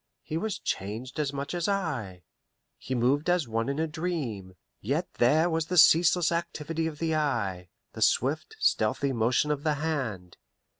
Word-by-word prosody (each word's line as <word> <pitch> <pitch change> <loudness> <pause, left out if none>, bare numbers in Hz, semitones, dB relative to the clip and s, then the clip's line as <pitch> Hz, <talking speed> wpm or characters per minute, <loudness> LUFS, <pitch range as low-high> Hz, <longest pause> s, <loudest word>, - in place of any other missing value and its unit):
He 155 - -5
was 210 +4 -2
changed 110 +9 -4
as 145 -2 0
much 140 +2 -4
as 175 -1 -1
I; 135 - -2 0.6
he 130 - -4
moved 135 +7 +1
as 175 -6 +2
one 115 +2 -1
in 140 - -2
a 160 - +1
dream; 150 - -4 0.2
yet - - -1
there 155 +8 +4
was 165 -2 -1
the 180 - -1
ceaseless 170 +1 +6
activity 165 -1 -2
of 155 -2 -6
the 160 +1 -1
eye, 100 - -1 0.2
the - - -8
swift, 150 - +1
stealthy 140 - +1
motion 120 +5 +1
of 145 -1 -1
the 150 0 +1
hand. 130 - -3
150 Hz, 165 wpm, -28 LUFS, 120-165 Hz, 0.6 s, ceaseless